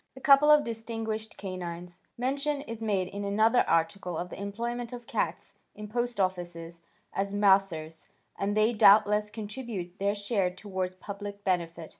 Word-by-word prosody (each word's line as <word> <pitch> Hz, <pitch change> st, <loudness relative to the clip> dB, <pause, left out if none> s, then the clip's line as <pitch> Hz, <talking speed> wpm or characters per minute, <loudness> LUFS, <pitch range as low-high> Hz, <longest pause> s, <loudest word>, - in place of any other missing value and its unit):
A -, -, -10 dB
Couple 280 Hz, +2 st, +6 dB
of 300 Hz, -1 st, +7 dB
Distinguished 225 Hz, -1 st, -4 dB
Canines 180 Hz, -2 st, -6 dB, 0.2 s
Mention 280 Hz, +3 st, -1 dB
is 230 Hz, -5 st, -7 dB
made 200 Hz, -4 st, 0 dB
in 200 Hz, +1 st, -5 dB
another 215 Hz, +4 st, +3 dB
article 165 Hz, +1 st, 0 dB
of 180 Hz, +2 st, -4 dB
the -, -, -7 dB
employment 235 Hz, +4 st, -4 dB
of 240 Hz, -1 st, -8 dB
cats -, -, -3 dB, 0.2 s
in 210 Hz, 0 st, -7 dB
post 240 Hz, 0 st, -2 dB
offices 175 Hz, -3 st, -3 dB, 0.3 s
as 200 Hz, +1 st, -2 dB
"mousers," 190 Hz, -6 st, +2 dB, 0.3 s
and 205 Hz, +1 st, -1 dB
they 215 Hz, +2 st, +4 dB
doubtless 210 Hz, 0 st, +5 dB
contribute 210 Hz, -4 st, -6 dB
their 200 Hz, +1 st, +1 dB
share 200 Hz, -2 st, 0 dB
towards 185 Hz, -1 st, -4 dB
public 200 Hz, +1 st, -7 dB
benefit. 170 Hz, -4 st, -1 dB
205 Hz, 150 wpm, -29 LUFS, 185-225 Hz, 0.3 s, of